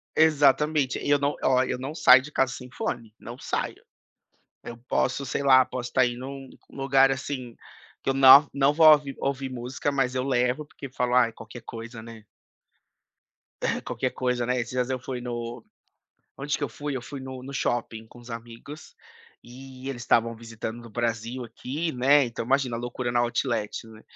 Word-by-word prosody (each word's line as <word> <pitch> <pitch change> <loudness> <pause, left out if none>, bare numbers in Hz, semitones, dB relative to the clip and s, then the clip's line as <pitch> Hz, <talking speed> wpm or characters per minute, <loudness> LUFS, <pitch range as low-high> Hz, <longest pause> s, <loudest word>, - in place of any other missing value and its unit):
Exatamente 150 -2 +3
e - - -4
eu 145 - +4
não 140 +1 0
olha 130 -1 +2
eu - - -2
não 135 +4 -5
saio 130 -4 +7
de 150 +2 -11
casa 135 -2 +1
sem 125 -1 -9
fone, 115 -4 -4
não 120 +2 -9
saio, - - -4 0.8
eu 120 - -8
posso, 130 +2 0
sei 135 - -2
lá, 130 -2 +6
posso 125 -1 -6
tá 130 -1 +4
indo 120 0 -3
num 135 -1 -8 0.2
lugar 135 0 +3
assim 130 -3 -5 0.5
que - - -1
eu - - +2
não 135 +2 +8
não 140 +1 +3
vou 160 +1 +6
ouvir 145 -2 +2
ouvir 135 -1 -2
música, 125 +3 -3
mas 135 -2 0
eu 130 -1 -1
levo, 125 +2 0
porque 140 -2 -10
falo: 125 -1 -1
"Aí 120 -2 +4
qualquer 120 +1 -11
coisa, 115 0 -9
né". 115 -1 -11 1.6
Qualquer 130 - -2
coisa, 125 -1 -1
né. 125 +1 0
Esses 120 +1 -4
dias 125 0 -1
eu 130 -1 -2
fui 125 -1 -6
no 120 -1 -5 0.7
onde 145 +2 -2
que - - -1
eu - - -3
fui, 145 -2 -5
eu 120 - -5
fui 140 +2 -8
no 130 -1 -8
no 135 +2 -8
shopping 115 -4 -2
com 120 - -16
os 120 0 -13
amigos 115 +6 -10 0.5
e 130 +1 -11
eles 120 -3 -5
estavam 115 -1 +2
visitando 115 0 -7
do 115 - -12
Brasil 120 +2 -3
aqui, 140 +8 -4
né. 135 +3 +4
Então 115 -1 -5
imagina 130 -1 +1
a 115 - -5
loucura 120 0 -4
na 120 - +2
outlet, 120 -3 -2
né, 110 0 -14
130 Hz, 190 wpm, -26 LUFS, 120-135 Hz, 1.6 s, não